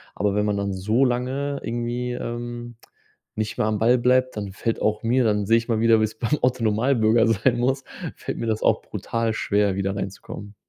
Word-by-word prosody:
aber 100 Hz, -1 st, 0 dB
wenn 105 Hz, 0 st, +1 dB
man 105 Hz, -1 st, 0 dB
dann 100 Hz, 0 st, -1 dB
so 110 Hz, +8 st, +1 dB
lange 130 Hz, +3 st, -1 dB
irgendwie, 120 Hz, +1 st, -2 dB
ähm, 120 Hz, 0 st, -5 dB, 0.6 s
nicht 110 Hz, 0 st, -3 dB
mehr 105 Hz, -, +1 dB
am 105 Hz, -1 st, 0 dB
Ball 120 Hz, +3 st, +4 dB
bleibt, 130 Hz, +1 st, +2 dB
dann 100 Hz, -2 st, -4 dB
fällt 115 Hz, +3 st, -3 dB
auch 110 Hz, +1 st, 0 dB
mir 125 Hz, +3 st, +2 dB
dann 105 Hz, -2 st, +1 dB
sehe 115 Hz, +3 st, +4 dB
ich 115 Hz, -, -3 dB
mal 115 Hz, -2 st, +1 dB
wieder, 115 Hz, -1 st, +5 dB
wie -, -, +3 dB
es 110 Hz, +1 st, -8 dB
beim 135 Hz, +6 st, 0 dB
Otto-Normalbürger 115 Hz, -1 st, +2 dB
sein 115 Hz, +3 st, +2 dB
muss 130 Hz, +3 st, 0 dB, 0.3 s
fällt -, -, -5 dB
mir 115 Hz, -, -3 dB
das 110 Hz, -1 st, -1 dB
auch -, -, +3 dB
brutal 115 Hz, -1 st, -2 dB
schwer 100 Hz, -2 st, +1 dB
wieder 95 Hz, 0 st, -1 dB
reinzukommen. 100 Hz, +1 st, -7 dB
115 Hz, 200 wpm, -23 LUFS, 105-125 Hz, 0.6 s, wieder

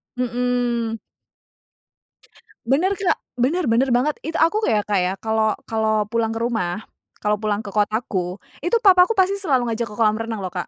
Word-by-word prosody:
Mhm. 245 Hz, -2 st, -1 dB, 1.7 s
Bener, 310 Hz, +10 st, +2 dB
Kak. 390 Hz, -2 st, +1 dB, 0.2 s
Bener, 270 Hz, +1 st, +1 dB
bener 255 Hz, +4 st, +3 dB
banget, 290 Hz, +5 st, 0 dB
itu 320 Hz, +2 st, -6 dB
aku 335 Hz, +7 st, +3 dB
kayak 215 Hz, -, +1 dB
kayak 190 Hz, -2 st, 0 dB
kalau 220 Hz, -1 st, +1 dB
kalau 220 Hz, -1 st, 0 dB
pulang 230 Hz, -1 st, +1 dB
ke -, -, -3 dB
rumah, 210 Hz, -4 st, -2 dB, 0.4 s
kalau 210 Hz, 0 st, +1 dB
pulang 215 Hz, 0 st, -1 dB
ke 200 Hz, -, -7 dB
kotaku, 205 Hz, -4 st, -1 dB, 0.2 s
itu 350 Hz, +9 st, 0 dB
papaku 370 Hz, +2 st, +6 dB
pasti 390 Hz, +1 st, +2 dB
selalu 260 Hz, -10 st, +1 dB
ngajak 230 Hz, +1 st, -2 dB
ke 210 Hz, -, -10 dB
kolam 215 Hz, -1 st, +2 dB
renang 225 Hz, -3 st, -4 dB
loh, 185 Hz, -, -4 dB
Kak, 180 Hz, -1 st, -4 dB
230 Hz, 165 wpm, -21 LUFS, 215-275 Hz, 1.7 s, papaku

